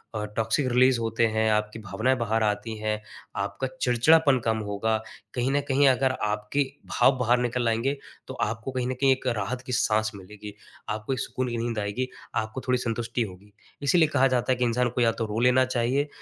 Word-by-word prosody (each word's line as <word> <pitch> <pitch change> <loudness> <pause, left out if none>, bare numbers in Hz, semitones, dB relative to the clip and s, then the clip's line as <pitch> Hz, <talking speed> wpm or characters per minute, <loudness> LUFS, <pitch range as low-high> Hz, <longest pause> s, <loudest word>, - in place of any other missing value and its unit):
अ, 105 - -2
toxic 115 +5 +1
release 125 0 +4
होते 115 0 +1
हैं, 110 0 +1
आपकी 105 +1 -1
भावनाएँ 110 +5 0
बाहर 115 -1 0
आती 105 +1 -1
हैं, 110 0 -2 0.3
आपका 100 +6 -2
चिड़चिड़ापन 135 +3 +4
कम 110 -1 +2
होगा, 110 +2 0 0.4
कहीं 125 +1 0
न 145 +1 +2
कहीं 140 +1 +4
अगर 130 0 +2
आपके 105 +6 0 0.3
भाव 130 - +3
बाहर 125 0 +3
निकल 125 0 0
आएँगे 120 +6 0 0.3
तो - - -6
आपको 115 +4 -4
कहीं 125 -1 -1
न - - 0
कहीं 135 -1 +5
एक 130 0 -5
राहत 120 +1 -2
की - - -4
साँस 110 -1 +1
मिलेगी, 105 +2 -10 0.4
आपको 110 +5 -2
एक 130 - -3
सुकून 130 -1 -2
की 120 - -3
नींद 115 -1 -2
आएगी, 105 +5 -2 0.3
आपको 110 +3 -2
थोड़ी 125 0 +3
संतुष्टि 120 0 -2
होगी। 100 +1 -10 0.3
इसीलिए 160 +3 +4
कहा 135 -2 +3
जाता 125 -1 +1
है - - -1
कि 125 - 0
इंसान 120 +1 +1
को 120 +1 -2
या 115 -1 +4
तो 115 - -3
रो 105 +1 -3
लेना 125 +2 +4
चाहिए 130 +3 0
120 Hz, 205 wpm, -26 LUFS, 110-130 Hz, 0.4 s, कहीं